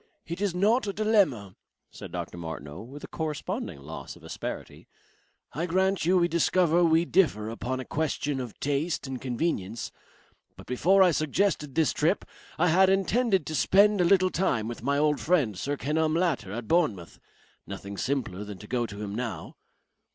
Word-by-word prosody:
"It 170 +3 -6
is 200 -4 0
not 210 +6 +2
a 200 - -2
dilemma," 190 - +1 0.4
said - - -10
Dr. - - -5
Martineau, 80 -3 -7
with 135 +6 -10
a - - -6
corresponding 155 - -4
loss 70 -2 -8
of - - -18
asperity. - - -7 0.7
"I 165 +6 -2
grant 190 +1 +1
you 185 +2 +4
we 175 -1 +3
discover 175 0 +3
we 165 0 +4
differ 130 - +2
upon 130 +3 -3
a 130 - -5
question 145 -2 -2
of 125 -5 -7
taste 145 +4 -1
and 130 -2 -5
convenience. 120 - -2 0.7
But - - -12
before 190 +10 +4
I 180 - +5
suggested 155 -1 0
this 160 -2 +2
trip, 165 +6 +1 0.3
I 175 +2 +3
had 190 +3 +5
intended 195 - +2
to 155 - -5
spend 200 +5 +4
a - - +4
little 185 +1 +4
time 120 - 0
with 120 -1 -6
my 140 +4 0
old 150 0 +2
friend 150 - +1
Sir 140 +10 -3
Kenelm 155 +3 0
Latter 140 - 0
at 115 +2 -5
Bournemouth. 130 - 0 0.5
Nothing 100 +1 -7
simpler 115 -5 -2
than 105 -2 -8
to 105 - -11
go 120 -1 -1
to 105 0 -7
him 100 -1 -5
now...." 120 +1 -5
150 Hz, 175 wpm, -27 LUFS, 115-180 Hz, 0.7 s, I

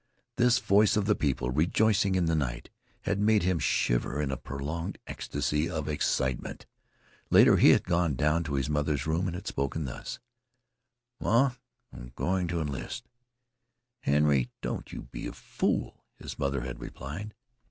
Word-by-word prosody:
This 125 0 +5
voice 105 -3 +4
of 105 - +1
the 105 - +4
people 65 -7 -1
rejoicing 95 - +2
in 90 -2 +2
the 80 - +1
night 60 -6 -3 0.3
had 100 0 -1
made 105 -1 +3
him 90 -2 +1
shiver 65 0 +1
in 75 -2 -1
a - - -1
prolonged 75 +9 -5
ecstasy 75 +2 -2
of 80 -4 -3
excitement. 65 -4 -1 0.6
Later, - - +7
he - - +7
had - - +5
gone 85 -4 +1
down 75 +6 +2
to 70 -2 -2
his 70 0 0
mother's 75 -2 0
room 80 +4 0
and 90 - -3
had 90 - -7
spoken 70 +3 -2
thus: 60 - -6 1.0
"Ma, 125 +4 +3 0.4
I'm 60 -1 -10
going 90 0 0
to 85 -1 -1
enlist." 75 - -5 0.9
"Henry, 70 -3 +2
don't - - -4
you - - -6
be - - -7
a - - -6
fool," - - -2
his - - -8
mother 70 -1 0
had 65 0 -6
replied. 95 +11 -7
80 Hz, 160 wpm, -29 LUFS, 70-95 Hz, 1.0 s, Later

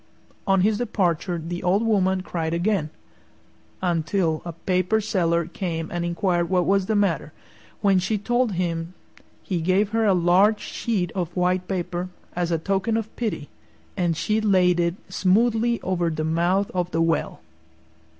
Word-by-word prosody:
On 195 -1 +4
his 210 +2 +2
departure 180 -6 0
the 170 +2 -5
old 195 +5 +2
woman 190 -4 +2
cried 165 -3 -3
again, 175 -3 0 0.9
until 165 -1 0
a 170 - -6
Paper 185 +5 0
Seller 170 -5 +1
came 165 -2 -4
and 175 0 -2
inquired 175 0 0
what 180 -2 +2
was 195 -1 +2
the 220 - +1
matter. 170 -7 0 0.5
When 195 -3 +4
she 210 +4 0
told 240 +1 0
him 170 -1 -2 0.5
he 180 -4 -2
gave 190 +4 +2
her 225 +1 +1
a 195 - +4
large 185 +5 +4
sheet 195 -6 -2
of 175 -3 -4
white 180 0 +1
paper, 180 -1 -3 0.3
as 175 -1 -1
a 165 - +1
token 195 +6 0
of 225 -1 -5
pity, 215 -11 -3 0.5
and 175 -4 0
she 215 +4 0
laid 185 -4 +3
it 170 0 +1
smoothly 225 +4 +2
over 175 -2 0
the 155 -1 -3
mouth 175 +5 +1
of 180 -1 -1
the 165 - -2
well. 165 -1 -1
180 Hz, 160 wpm, -24 LUFS, 170-200 Hz, 0.9 s, On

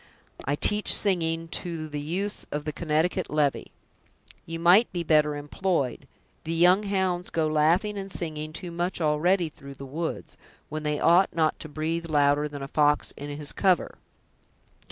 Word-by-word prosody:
"I 145 - 0
teach 210 +7 +3
singing 165 -4 +2
to 165 -3 -3
the 150 -1 -5
youths 190 +7 -4
of 150 0 -4
the 150 - -3
Connecticut 170 +3 -1
levy." 150 -2 0 0.8
"You 165 0 -5
might 180 +7 +5
be 175 -2 -3
better 150 -2 +3
employed. 145 -2 -2 0.4
The 165 +1 -3
young 180 +4 +5
hounds 190 -3 -1
go 160 -1 0
laughing 165 +7 +1
and 195 0 -7
singing 155 -3 -3
too 175 +2 -7
much 175 +2 -2
already 165 +3 +2
through 140 -2 -12
the 135 - -9
woods, 160 +5 -5 0.3
when 155 +1 -4
they 150 -1 -2
ought 175 +1 +4
not 160 -2 +1
to 155 - -8
breathe 165 +3 -3
louder 145 0 +2
than 145 -2 -7
a - - -5
fox 150 0 +2
in 145 +1 -7
his 145 0 -2
cover. 185 -4 +1
160 Hz, 165 wpm, -26 LUFS, 150-180 Hz, 0.8 s, might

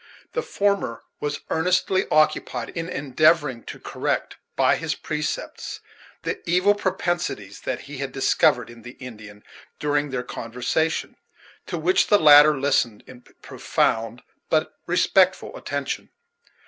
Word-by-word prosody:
The 475 - 0
former 200 - -1 0.2
was 145 0 -3
earnestly 180 +3 +1
occupied 155 0 +1
in 165 0 -5
endeavoring 145 -2 +2
to - - -8
correct, - - -2 0.2
by - - +4
his - - -2
precepts, - - -4 0.4
the - - -3
evil 180 +4 +4
propensities 175 - -2
that 130 - -2
he 140 -1 -9
had 135 -1 -3
discovered 125 -2 +2
in 120 -1 -14
the 120 +2 -10
Indian 105 -5 -11 0.3
during 145 0 0
their 125 -2 -3
conversation; 125 +7 -2 0.5
to 175 - -3
which 175 +4 +2
the 205 - +6
latter 150 -3 +7
listened 120 -6 +1
in 125 -1 -13 0.2
Profound 115 +2 -1 0.3
but 155 0 +1
respectful 185 - +2
attention. - - -4
145 Hz, 125 wpm, -23 LUFS, 125-175 Hz, 0.5 s, latter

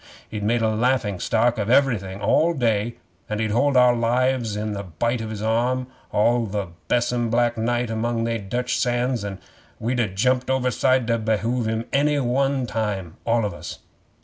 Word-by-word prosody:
He 105 - -3
made 115 +3 +1
a 110 0 +2
laughing 115 -4 0
stock 115 +3 +1
of 105 +1 -1
everything 110 -8 +2
all 160 +11 +3
day, 115 -3 0 0.3
and 105 0 -2
he'd 110 -1 0
hold 135 +4 +2
our 125 -1 +6
lives 120 -1 +1
in 105 0 -3
the 100 - -4
bight 115 +7 -2
of 110 - -5
his 105 -1 -5
arm 120 +3 +1 0.3
all 115 +2 +2
the 100 -2 -3 0.2
besom 120 -1 +1
black 120 +1 +2
night 120 +1 -1
among 115 +1 -1
they 115 0 -1
Dutch 125 +5 -2
sands; 120 -2 0
and 100 -2 -5 0.4
we'd 125 +2 -1
ha' 110 -5 +1
jumped 125 +4 +1
overside 130 -1 +2
to 115 0 +1
behove 110 +2 0
him 110 +1 -2
any 145 +1 +2
one 135 +1 +1
time, 105 -7 -3
all 115 -1 +2
of 105 - -3
us. - - -8
115 Hz, 180 wpm, -23 LUFS, 110-125 Hz, 0.4 s, our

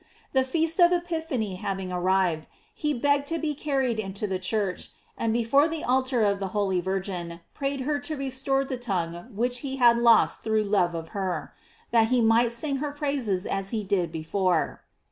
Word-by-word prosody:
The 265 -1 +4
feast 325 +6 -1
of 350 0 +7
Epiphany 320 - -2
having 190 -1 -4
arrived, 180 -3 +1 0.3
he 300 - -1
begged 285 +2 +1
to 330 - -1
be 310 -2 -1
carried 270 -5 -1
into 200 0 -3
the 190 -2 -2
church, 190 -1 -2 0.3
and 230 - -1
before 240 +6 +3
the 325 -1 -4
altar 255 -1 +2
of 200 -1 +2
the 195 - -2
holy 190 -3 +1
Virgin 180 -2 -3
prayed 275 -1 -2
her 290 +2 0
to 290 +2 -3
restore 270 0 -1
the 265 -1 -4
tongue 175 -6 -3
which 245 +3 0
he 270 0 -4
bad 235 -2 +5
lost 235 -2 +4
through 220 -1 +1
love 190 -4 +1
of 165 0 -5
her, 185 -5 -3 0.4
that 225 -1 +4
he 250 +1 +2
might 230 +1 +4
sing 275 +4 0
her 295 +2 -2
praises 275 - -1
as 195 0 -2
he 215 -1 -2
did 185 -4 0
before. 175 +3 0
230 Hz, 185 wpm, -26 LUFS, 190-275 Hz, 0.4 s, of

